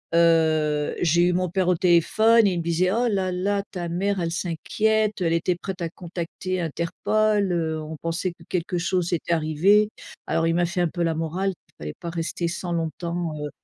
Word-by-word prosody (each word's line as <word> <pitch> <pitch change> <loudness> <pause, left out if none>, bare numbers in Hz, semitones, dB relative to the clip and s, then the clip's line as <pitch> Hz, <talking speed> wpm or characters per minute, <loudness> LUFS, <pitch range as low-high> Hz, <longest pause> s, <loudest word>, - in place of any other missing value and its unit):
heu, 160 -3 +3
j'ai 170 0 +3
eu 175 0 +3
mon 180 -1 0
père 185 0 0
au 180 - +4
téléphone, 205 +6 +4
il 180 -3 0
me - - -3
disait: 170 +2 +1
«Oh 240 +2 +2
là, 190 -2 0
là 200 +2 0
ta 175 -3 -4
mère 190 +2 -1
elle 165 0 -1
s'inquiète, 210 +5 0
elle 165 -1 +2
était 175 +2 +1
prête 190 -2 -5
à 165 - -1
contacter 180 +1 -5
Interpol, 200 +5 0
heu, 160 -2 -1
on 155 0 -7
pensait 165 +2 -2
que 170 -1 -17
quelque 180 0 -1
chose 180 0 0
était 170 0 0
arrivé». 170 +7 +3 0.4
Alors 165 0 +1
il 165 - +1
m'a 175 0 +2
fait 175 +1 -3
un 175 - +3
peu 175 +2 -3
la 165 -1 +1
morale, 170 +5 -1
qu'il - - -30
fallait 75 0 -6
pas 170 - -5
rester 170 0 -2
sans 175 +1 -4
longtemps, 170 0 -2
heu - - -4
175 Hz, 200 wpm, -24 LUFS, 165-185 Hz, 0.4 s, au